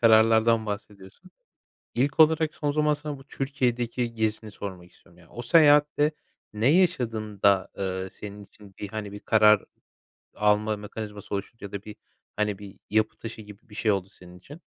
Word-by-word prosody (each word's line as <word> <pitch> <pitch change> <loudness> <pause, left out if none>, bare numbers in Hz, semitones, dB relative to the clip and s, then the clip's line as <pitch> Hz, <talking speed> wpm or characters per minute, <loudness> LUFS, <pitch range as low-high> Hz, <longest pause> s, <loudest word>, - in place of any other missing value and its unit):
kararlardan 110 0 +5
bahsediyorsun. 100 - -8 0.6
İlk 140 +5 +1
olarak, 160 0 +4
son 145 -1 -1
zaman 150 0 +2
sana 150 -1 -6
bu 135 - -15
Türkiye'deki 125 -4 -2
gezini 110 -1 -2
sormak 90 -4 -8
istiyorum. 85 - -23
Ya, 85 - -19
o 120 - -7
seyahatte 150 +2 +5 0.4
ne 105 +2 -1
yaşadın 120 - +1
da, 100 -2 +4
ııı, 95 -1 -3
senin 100 +1 -9
için 100 -1 -18
bir, 105 - -5
hani, 105 -1 -6
bir 105 - -8
karar 105 -1 +5 0.7
alma 105 +1 +2
mekanizması 105 -1 -7
oluşunca 100 +1 -6
da 100 -1 -5
bir, 105 -1 -10 0.4
hani, 105 -2 -1
bir 100 -2 -11
yapı 110 +1 +1
taşı 115 -1 -8
gibi 105 +4 -15
bir 105 - -14
şey 110 +1 +1
oldu 95 -1 -2
senin 90 -2 -15
için? 145 - -13
110 Hz, 165 wpm, -26 LUFS, 100-125 Hz, 0.7 s, kararlardan